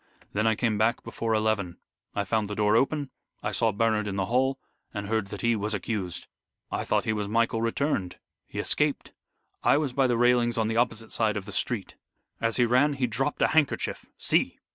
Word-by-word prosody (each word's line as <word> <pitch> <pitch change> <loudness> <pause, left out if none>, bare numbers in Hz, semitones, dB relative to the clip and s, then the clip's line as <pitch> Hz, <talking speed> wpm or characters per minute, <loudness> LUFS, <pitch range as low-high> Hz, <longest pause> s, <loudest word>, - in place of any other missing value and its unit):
Then 110 +2 +1
I 110 - +3
came 110 -2 0
back 115 +3 +2
before 115 -1 -2
eleven. 105 -5 0 0.4
I 100 - +1
found 105 +1 0
the 105 - -4
door 105 +1 +3
open, 140 +2 +1 0.3
I - - -1
saw 115 - +2
Bernard 105 0 +1
in 100 - -3
the 95 -1 0
hall, 130 +5 +1 0.4
and 100 0 -3
heard 110 -1 0
that 105 0 -7
he 115 0 +2
was 105 0 -1
accused. 100 -3 -3 0.5
I - - -1
thought - - +1
he 110 - +1
was 105 -1 -2
Michael 115 +1 +1
returned. 115 -5 -1 0.3
He - - -10
escaped. - - 0 0.5
I - - +4
was 145 -4 -1
by 135 0 +3
the 120 -2 +1
railings 120 -1 +3
on 110 -1 +1
the 115 - -1
opposite 115 -2 0
side 110 -2 +1
of 100 - -5
the 100 - -8
street. 105 +1 -2 0.4
As 115 0 0
he 120 - +4
ran 130 +5 +3
he 135 -2 0
dropped 135 +5 -1
a - - +4
handkerchief. 160 -3 +1
See!" - - +1
115 Hz, 210 wpm, -27 LUFS, 105-120 Hz, 0.5 s, I